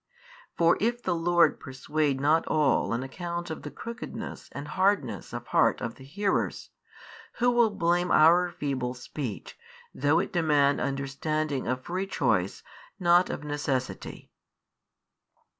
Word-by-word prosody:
For 170 0 +4
if 240 +3 0
the 185 - 0
Lord 170 0 +3
persuade 145 +1 -1
not 150 +4 +2
all 150 -3 +2
on 120 +2 -1
account 170 +5 -5
of 160 - -6
the 150 - -6
crookedness 230 +3 -7
and 145 +1 -7
hardness 185 - 0
of - - -6
heart - - +2
of 115 - -4
the 135 - -15
hearers, 195 +9 -2 0.6
who 245 +1 +2
will 240 -2 +4
blame 175 -2 +1
our 175 +3 +5
feeble 130 -6 -3
speech, 125 -2 -7 0.3
though 145 +4 +2
it 175 - -1
demand 150 -5 +3
understanding 140 +1 -2
of 130 +1 -2
free 185 +3 -3
choice 110 - 0 0.4
not 175 0 +4
of - - -5
necessity? 145 -3 -4
155 Hz, 135 wpm, -27 LUFS, 135-175 Hz, 0.6 s, our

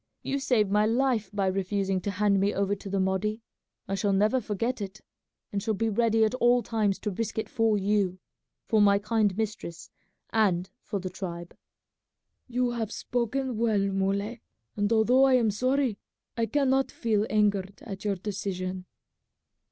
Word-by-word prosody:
You 275 - -1
saved 220 -7 +2
my 210 +1 +3
life 235 -3 +1
by 205 -2 0
refusing 195 0 0
to 200 - -3
hand 200 0 +2
me 200 +2 +1
over 200 0 +1
to 200 0 -6
the 195 0 0
Mahdi. 190 +4 -1 0.4
I 195 - -3
shall 200 0 +1
never 215 +6 +3
forget 230 +3 -2
it, 200 +1 -6 0.5
and 200 - -2
shall 215 +1 -1
be 225 +3 0
ready 225 +1 +2
at 215 - -1
all 245 -1 +3
times 210 -4 0
to 210 - -2
risk 220 +3 -4
it 220 - -1
for 225 -5 +2
you, 200 -2 +1 0.5
for 220 -2 +3
my 200 -1 +5
kind 210 -1 +1
mistress, 200 -6 -4 0.4
and 190 -5 +2
for 205 - -4
the 185 0 -5
tribe." 175 -2 -6 0.9
"You 250 0 0
have 225 -3 -3
spoken 245 +1 -2
well, 225 -2 +2
Muley, 200 +4 -1 0.3
and 205 +1 0
although 240 +4 +5
I 265 -1 +5
am 230 -4 +3
sorry, 255 0 0 0.4
I 230 -1 0
cannot 270 -1 +2
feel 215 -2 0
angered 200 -2 0
at 195 -3 -7
your 205 -2 0
decision." 185 -1 -4
210 Hz, 165 wpm, -28 LUFS, 195-230 Hz, 0.9 s, my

